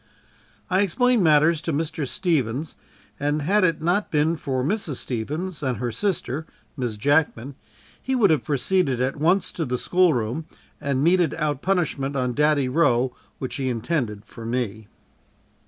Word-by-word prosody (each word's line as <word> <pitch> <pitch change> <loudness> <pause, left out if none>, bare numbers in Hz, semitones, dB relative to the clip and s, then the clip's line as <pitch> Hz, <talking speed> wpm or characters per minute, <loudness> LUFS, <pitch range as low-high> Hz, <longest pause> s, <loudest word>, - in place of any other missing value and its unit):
I 185 +1 +2
explained 245 +4 +2
matters 155 0 +4
to 165 - -2
Mr. 150 -1 -2
Stevens 145 - -1 0.4
and 145 +1 0
had 200 +6 +3
it 165 -3 +1
not 180 +5 +1
been 155 +2 +2
for 135 -5 -2
Mrs. 175 -2 -1
Stevens 150 +11 -4
and 130 -5 -1
her 120 +2 -2
sister, 155 - -2 0.3
Miss 120 -6 -3
Jackman, 140 0 +1 0.5
he 265 - -1
would 220 -8 +4
have 155 - +2
proceeded 145 -1 +1
at 130 +3 -1
once 175 +6 +2
to 165 - -3
the 125 -3 -2
school 180 +2 +3
room 120 +7 -3 0.3
and 140 -2 0
meted 175 -2 +3
out 150 -3 -1
the - - -19
punishment 150 -7 0
on 125 -2 0
"Daddy" 150 -1 +2
Roe 125 -3 +2 0.2
which 130 - -4
he 135 -2 -1
intended 115 -4 -2
for 115 - -11
me. 115 -3 -3
150 Hz, 160 wpm, -24 LUFS, 125-170 Hz, 0.5 s, matters